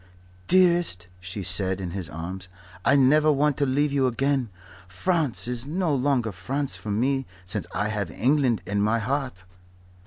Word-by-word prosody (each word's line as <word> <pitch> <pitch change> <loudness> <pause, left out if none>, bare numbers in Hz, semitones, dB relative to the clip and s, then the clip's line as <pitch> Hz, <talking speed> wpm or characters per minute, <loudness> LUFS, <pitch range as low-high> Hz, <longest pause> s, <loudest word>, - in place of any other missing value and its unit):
"Dearest," 175 - +4
she 95 +3 -6
said, 95 +1 +1
in 90 -2 -4
his 90 -5 -5
arms, 90 +4 -6 0.4
"I 140 - +4
never 150 +3 +5
want 145 0 +2
to 140 - +1
leave 145 +3 +1
you 135 -2 +2
again. 135 0 0 0.4
France 145 - -1
is 125 +1 -2
no 170 0 0
longer 130 -4 +1
France 135 +10 -3
for 110 - -7
me 130 +5 0 0.2
since 90 -1 -2
I 105 0 -1
have 105 -4 -2
England 130 - +1
in 100 0 -1
my 110 +3 +2
heart." 125 -4 -3
125 Hz, 160 wpm, -25 LUFS, 100-140 Hz, 0.4 s, never